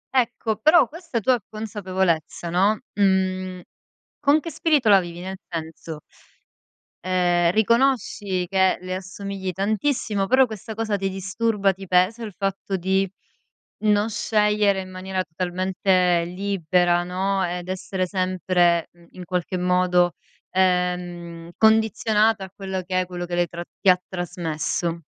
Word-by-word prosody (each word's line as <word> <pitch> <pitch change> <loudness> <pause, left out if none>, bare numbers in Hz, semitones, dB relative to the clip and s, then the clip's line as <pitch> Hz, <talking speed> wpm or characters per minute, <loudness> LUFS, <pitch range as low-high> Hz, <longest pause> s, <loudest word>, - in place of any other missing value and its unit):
Ecco, 235 -3 +1
però 310 +2 +5
questa 330 -7 -4
tua 245 +3 +2
consapevolezza, 190 -6 -2
no, 200 +4 +3 0.2
mhmm, 185 -2 +1 0.6
con 295 +1 +4
che 330 - -6
spirito 295 -6 +1
la 200 -2 +7
vivi? 175 -1 -7
Nel 190 +1 -6
senso, 160 -1 -6 1.0
ehm, 175 -1 +2
riconosci 220 -5 +1
che 190 0 +2
le 185 0 -4
assomigli 190 0 -5
tantissimo, 210 - 0
però 260 +2 +5
questa 220 +1 -7
cosa 215 -2 -1
ti 195 0 -1
disturba? 195 +1 0
Ti 195 +1 -10
pesa 185 +6 +2
il 210 -4 -6
fatto 195 0 -2
di 190 +2 +1 0.8
non 210 +1 +3
scegliere 210 -2 +2
in 185 - -9
maniera 185 0 -3
totalmente 180 0 +1
libera, 180 -2 +1
no, 190 +1 -1
ed 175 0 -5
essere 185 0 -2
sempre, 180 -2 +1
mhmm, 170 -1 -21
in 180 -1 -10
qualche 180 +1 -2
modo 180 -1 +2 0.4
ehm, 180 -2 -1
condizionata 220 -1 +3
a - - -12
quello 190 -1 -4
che 185 0 0
è, - - -3
quello 175 -1 -5
che 175 - -3
lei 175 0 +1
tra 170 0 -7 0.2
ti 195 - +4
ha 180 0 +5
trasmesso? 170 -2 -2
190 Hz, 135 wpm, -23 LUFS, 180-210 Hz, 1.0 s, la